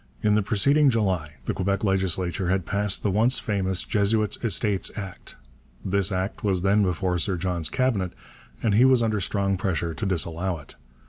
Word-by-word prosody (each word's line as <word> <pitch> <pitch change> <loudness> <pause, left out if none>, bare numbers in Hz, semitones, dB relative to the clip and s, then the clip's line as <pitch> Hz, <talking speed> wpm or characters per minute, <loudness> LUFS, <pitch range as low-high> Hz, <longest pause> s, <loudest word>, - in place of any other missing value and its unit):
In 105 - +3
the 105 - +3
preceding 140 +9 +3
July 95 -10 0
the - - -1
Quebec 100 +1 -1
legislature 95 -3 0
had 95 -2 0
passed 100 -1 -1
the 105 - +1
once 115 +6 +3
famous 95 -3 -1
Jesuits' 105 -1 +1
Estates 105 -2 +1
Act. 95 -4 -8 0.5
This 100 0 +1
Act 95 +1 -3
was 95 -4 +1
then 100 +2 +3
before 90 -1 0
Sir 95 +2 0
John's 85 -2 -2
Cabinet 125 -9 0 0.5
and 110 - +2
he 115 +5 +5
was 130 -2 +5
under 110 -3 0
strong 100 +1 0
pressure 85 -3 -2
to 105 - -4
disallow 85 0 -1
it. 75 - -14
95 Hz, 175 wpm, -25 LUFS, 90-105 Hz, 0.5 s, he